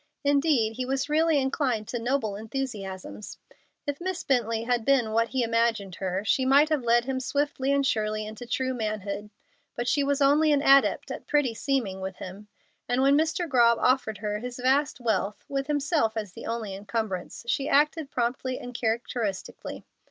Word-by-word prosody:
Indeed, 280 -6 +2
he 255 - -1
was 270 +2 -1
really 315 +1 +3
inclined 265 -5 0
to 240 - -2
noble 230 -3 -1
enthusiasms. 210 -4 -6 0.5
If 285 +2 -3
Miss 365 -2 -3
Bently 230 -3 0
had 240 -1 +1
been 245 -4 +2
what 230 +1 +2
he 260 0 0
imagined 230 -4 0
her, 190 +1 -2
she 260 - +2
might 280 +4 +5
have 305 -3 +1
led 235 0 +3
him 265 0 -2
swiftly 280 0 -1
and 280 0 +2
surely 215 -3 0
into 220 +3 -8
true 260 +2 -1
manhood; 210 -3 -4 0.5
but 240 0 -3
she 285 - +2
was 280 0 +1
only 295 +2 +4
an 285 -1 +2
adept 275 0 +4
at - - -7
pretty 290 -5 +2
seeming 225 -7 -1
with 190 0 -4
him, 195 +4 -9 0.4
and 250 +2 +2
when 275 +1 +5
Mr. 320 +3 +1
Grobb 235 -4 +4
offered 250 -5 +1
her 210 0 -3
his 245 +2 -6
vast 265 +3 +1
wealth, 210 -4 -1
with 275 0 -2
himself 290 -6 +1
as 210 -4 -4
the - - -8
only 225 -3 -3
incumbrance, 205 0 -4
she 270 +5 0
acted 300 +1 +2
promptly 255 +1 -1
and 245 - -8
characteristically. 225 -3 -3
245 Hz, 175 wpm, -27 LUFS, 220-275 Hz, 0.5 s, might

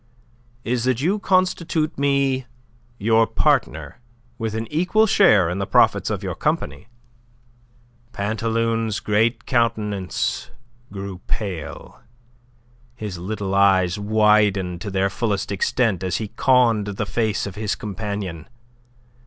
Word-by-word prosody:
"Is 120 0 -1
that 130 -2 +1
you 185 +9 +1
constitute 180 -5 +1
me 140 -2 +1 0.5
your 115 +1 +3
partner, - - 0 0.4
with 110 -2 -3
an 110 0 -2
equal 180 +7 +3
share 175 - +5
in 90 +3 -3
the 100 - -2
profits - - +3
of - - -3
your - - -3
company." 70 +5 -2 1.2
Pantaloon's 115 +1 -1
great 110 +2 +1
countenance 105 -6 -1 0.4
grew 100 -2 -6
pale, 95 -8 -5 1.0
his 105 -7 -6
little 100 +1 -4
eyes 95 -2 +3
widened 105 -4 +2
to 105 - -4
their 95 0 +1
fullest 100 -2 -2
extent 100 0 0
as 95 - -1
he 110 -2 -4
conned 120 -5 +3
the 100 -1 -3
face 110 -3 -1
of 100 - -6
his 105 +1 -2
companion. 100 -6 -5
105 Hz, 120 wpm, -22 LUFS, 100-120 Hz, 1.2 s, share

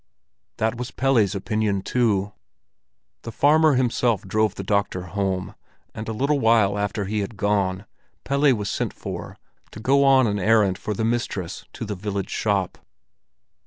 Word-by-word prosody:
That 110 +1 0
was 125 0 -4
Pelle's 115 -7 +1
opinion 105 -1 -1
too. 105 -5 0 0.9
The 115 - -7
farmer 155 +3 +4
himself 120 -4 +1
drove 110 +1 0
the 95 - -5
doctor 100 -2 0
home, 95 0 -3 0.4
and 110 +1 -6
a - - -1
little 140 +6 0
while 110 -4 +3
after 100 0 -2
he 105 +2 -2
had 100 +1 -4
gone, 100 -1 0 0.4
Pelle 140 +1 +3
was 105 -2 -4
sent - - -2
for, - - -7 0.3
to - - -11
go 135 +5 +3
on 135 -2 +5
an 105 -2 -1
errand 105 -2 +3
for 105 - -3
the 110 - -1
mistress 110 -6 -3
to 115 - -6
the 105 - -4
village 100 0 -4
shop. 100 -4 -1
105 Hz, 160 wpm, -23 LUFS, 100-120 Hz, 0.9 s, on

